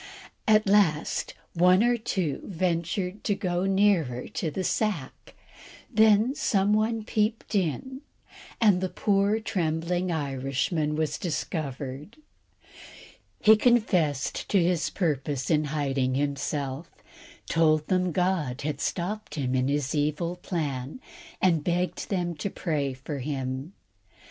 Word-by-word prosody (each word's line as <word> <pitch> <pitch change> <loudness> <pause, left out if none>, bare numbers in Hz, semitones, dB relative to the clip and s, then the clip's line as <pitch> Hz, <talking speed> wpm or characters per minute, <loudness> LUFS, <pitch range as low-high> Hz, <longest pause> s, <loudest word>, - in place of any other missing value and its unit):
At 215 0 +5
last 195 -7 +2 0.2
one 180 +4 +5
or 240 0 +3
two 190 -9 -2
ventured 180 +2 -2
to 205 - +2
go 180 -2 -1
nearer 190 -11 +2
to 165 - -2
the 185 +5 -3
sack, 195 -9 -2 0.6
then 220 +3 +5
some 205 -6 +1
one 220 +1 +1
peeped 215 +2 -1
in, 205 - -1 0.6
and 205 -5 +4
the 185 - -1
poor 200 +2 +1
trembling 175 -3 -1
Irishman 145 +1 -1
was 155 -1 -1
discovered. 150 - -4 1.2
He 220 0 +7
confessed 185 - +1
to 200 - +4
his 170 -1 +1
purpose 145 -6 -1
in 155 -1 +3
hiding 135 -3 -1
himself, 140 +1 -2 0.6
told 155 -2 +3
them 185 -1 +1
God 170 -7 0
had 145 -1 -3
stopped 210 +5 -3
him 130 -4 -1
in 130 0 +1
his 140 -1 -1
evil 155 +3 0
plan, 150 - -4 0.4
and 165 -5 +2
begged 180 +2 -1
them 175 -3 -1
to 200 - -3
pray 150 -8 -2
for 135 +2 -6
him. 135 +3 -4
170 Hz, 120 wpm, -27 LUFS, 145-195 Hz, 1.2 s, He